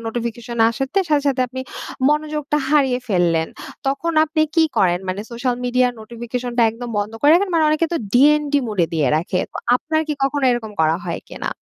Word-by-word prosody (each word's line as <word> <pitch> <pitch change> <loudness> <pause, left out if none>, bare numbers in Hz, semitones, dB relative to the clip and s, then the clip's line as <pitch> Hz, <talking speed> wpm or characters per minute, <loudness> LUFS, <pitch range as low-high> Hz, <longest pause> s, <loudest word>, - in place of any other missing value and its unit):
Notification 235 0 -4
আসাতে 270 - -2
সাথে, 295 -1 +3
সাথে, 265 -2 0
আপনি 260 +2 -6 0.5
মনোযোগটা 300 -1 -1
হারিয়ে 270 -4 +3
ফেললেন, 170 -4 +1 0.4
তখন 280 +5 -1
আপনি 315 0 -2
কি 325 -2 +5
করেন, 175 -2 +3
মানে 185 +2 -2
সোশ্যাল 245 +1 -1
মিডিয়া, 250 0 +2
নোটিফিকেশন 240 +2 -5
টা 235 - +6
একদম 235 +2 -7
বন্ধ 205 +2 -2
করে 290 - +5
রাখেন? 375 +2 +2
মানে 320 -1 +3
অনেকে 310 +2 +2
তো - - +1 0.2
ডিএনডি 290 +2 +4
মোড 210 -3 -6
এ - - -4
দিয়ে 150 -5 +2
রাখে। 175 +3 -1
তো - - -6 0.2
আপনার 315 +4 -1
কি 300 - 0
কখনো 275 +1 0
এরকম 235 -3 -2
করা 160 0 +3
হয় 170 -2 -4
কি - - -10
না? - - -1
250 Hz, 195 wpm, -20 LUFS, 220-300 Hz, 0.5 s, টা